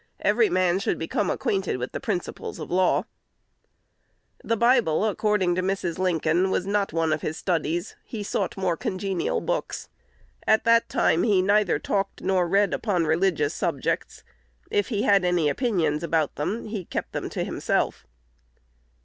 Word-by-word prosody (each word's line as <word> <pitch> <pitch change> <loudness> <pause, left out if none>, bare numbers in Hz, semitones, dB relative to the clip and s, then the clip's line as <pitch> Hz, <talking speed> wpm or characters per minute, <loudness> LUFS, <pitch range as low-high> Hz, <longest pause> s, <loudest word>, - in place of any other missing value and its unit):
Every 445 -3 +3
man 185 - +2
should - - -1
become 180 +4 -1
acquainted 190 -9 -1
of 125 - -4
the - - -4
principles 205 -9 -4
of 155 - -7
law." 185 0 +2 1.4
The 230 - 0
Bible, 235 -7 +3
according 210 -3 +1
to 185 - 0
Mrs. 185 -2 -2
Lincoln, 175 0 +1
was 185 - 0
not 200 0 0
one 165 -1 +1
of 155 - -2
his 155 - -3
studies: 170 +1 -1
"he 215 -3 -6
sought 200 - -2
more 185 -3 0
congenial 185 0 -2
books." - - -3 0.6
At 220 - +4
that 230 0 +4
time 165 - +2
he 200 -5 +3
neither 205 -2 +3
talked 195 +5 -2
nor 185 -2 +2
read 200 +3 +2
upon 185 -7 0
religious 160 -2 +1
subjects. - - -2 0.5
If 205 - +1
he 210 -5 -1
had 200 -2 +4
any 175 -4 +2
opinions 165 - 0
about 165 -3 0
them, 205 +10 -3
he 210 -3 -4
kept - - -4
them - - -4
to - - -3
himself. - - -1
185 Hz, 160 wpm, -25 LUFS, 170-205 Hz, 1.4 s, At